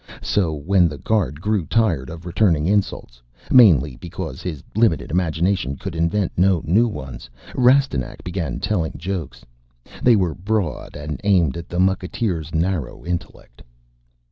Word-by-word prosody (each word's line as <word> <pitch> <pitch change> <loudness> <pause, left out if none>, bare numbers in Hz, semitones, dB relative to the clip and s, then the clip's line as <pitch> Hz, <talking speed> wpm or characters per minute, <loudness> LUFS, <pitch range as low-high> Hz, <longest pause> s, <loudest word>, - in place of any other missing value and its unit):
So, 90 -6 +1
when 90 +4 +3
the 75 -3 -6
guard 85 -2 -1
grew 105 -4 0
tired 90 - +1
of 85 +1 -9
returning 85 -4 +2
insults 90 -11 -1 0.3
mainly 75 - +6
because 85 -5 -7
his 80 -6 -5
limited 85 - +2
imagination 85 -2 0
could 95 +5 -6
invent 85 +4 0
no 90 -2 +3
new 105 +9 +3
ones 65 - -7 0.2
Rastignac 125 - +2
began 85 -7 -3
telling 85 -7 -1
jokes. 90 -2 -5 0.6
They 120 -2 +5
were 90 -6 +1
broad 95 - -3
and 75 +1 -6
aimed 90 -9 +3
at 85 - -7
the 90 - -4
mucketeer's 95 -3 -1
narrow 80 -3 -2
intellect. 85 -8 -6
85 Hz, 140 wpm, -21 LUFS, 75-100 Hz, 0.6 s, mainly